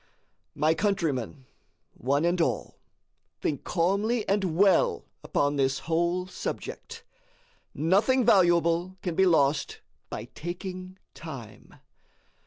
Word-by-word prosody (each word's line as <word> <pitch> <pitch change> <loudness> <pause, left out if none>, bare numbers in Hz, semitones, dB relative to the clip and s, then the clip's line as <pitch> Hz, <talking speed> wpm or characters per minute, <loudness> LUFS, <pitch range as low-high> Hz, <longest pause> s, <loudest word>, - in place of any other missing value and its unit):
My 155 +2 +3
countrymen, 160 - -1 0.5
one 140 +6 0
and 175 0 +1
all, 130 -9 -2 0.6
think 145 -4 -2
calmly 200 +6 0
and 190 -5 0
WELL 195 -2 +3 0.2
upon 145 0 0
this 135 0 +1
whole 170 +2 0
subject. 460 - -6 0.7
Nothing 205 - +3
valuable 175 -1 +3
can 175 - -2
be 190 +3 +3
lost 145 -4 +2 0.3
by - - -5
taking 185 +2 -6 0.2
time. - - -10
175 Hz, 100 wpm, -27 LUFS, 155-190 Hz, 0.7 s, My